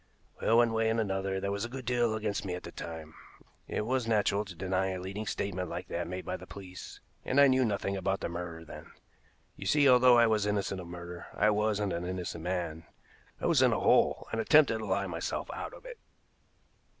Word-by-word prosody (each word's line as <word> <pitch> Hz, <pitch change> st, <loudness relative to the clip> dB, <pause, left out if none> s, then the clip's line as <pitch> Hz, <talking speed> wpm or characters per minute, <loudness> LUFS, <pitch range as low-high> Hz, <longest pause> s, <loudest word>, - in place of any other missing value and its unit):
"Well, 115 Hz, -, +4 dB
one 120 Hz, -1 st, +4 dB
way 110 Hz, 0 st, +2 dB
and 115 Hz, +1 st, +1 dB
another 95 Hz, -2 st, -1 dB
there 100 Hz, +1 st, -2 dB
was 100 Hz, +1 st, -2 dB
a 120 Hz, -, -3 dB
good 130 Hz, 0 st, -7 dB
deal 120 Hz, -2 st, +1 dB
against 105 Hz, -2 st, -2 dB
me 90 Hz, -3 st, -3 dB
at 90 Hz, -, -8 dB
the -, -, -8 dB
time. 80 Hz, -1 st, -8 dB, 0.5 s
It 105 Hz, -, -2 dB
was 125 Hz, 0 st, 0 dB
natural 105 Hz, -2 st, +2 dB
to 95 Hz, -3 st, -10 dB
deny 95 Hz, +2 st, 0 dB
a 95 Hz, -1 st, -3 dB
leading 100 Hz, +4 st, -5 dB
statement 90 Hz, -3 st, -3 dB
like 90 Hz, +2 st, -6 dB
that 85 Hz, 0 st, -3 dB
made 90 Hz, +1 st, -5 dB
by -, -, -3 dB
the -, -, -12 dB
police, 95 Hz, -2 st, -10 dB, 0.2 s
and 135 Hz, -, +1 dB
I 140 Hz, -, +9 dB
knew 130 Hz, -1 st, +4 dB
nothing 100 Hz, -3 st, -1 dB
about 95 Hz, 0 st, -1 dB
the -, -, -1 dB
murder 85 Hz, -1 st, -6 dB
then. -, -, -10 dB, 0.7 s
You -, -, -6 dB
see, 145 Hz, -2 st, +4 dB
although 125 Hz, -1 st, +7 dB
I 120 Hz, -, +6 dB
was 110 Hz, -2 st, +2 dB
innocent 100 Hz, -2 st, -1 dB
of 85 Hz, -, -10 dB
murder, 85 Hz, 0 st, -8 dB
I 105 Hz, -, +3 dB
wasn't 105 Hz, -2 st, 0 dB
an 85 Hz, +1 st, -3 dB
innocent 90 Hz, -3 st, -4 dB
man. 85 Hz, -3 st, -3 dB, 0.6 s
I -, -, -4 dB
was -, -, +4 dB
in -, -, +5 dB
a -, -, 0 dB
hole, -, -, +3 dB
and 115 Hz, -, 0 dB
attempted 140 Hz, -4 st, +5 dB
to 110 Hz, -, -5 dB
lie 100 Hz, +1 st, 0 dB
myself 85 Hz, -3 st, -4 dB
out -, -, -6 dB
of -, -, -15 dB
it." -, -, -9 dB
100 Hz, 220 wpm, -30 LUFS, 90-115 Hz, 0.7 s, I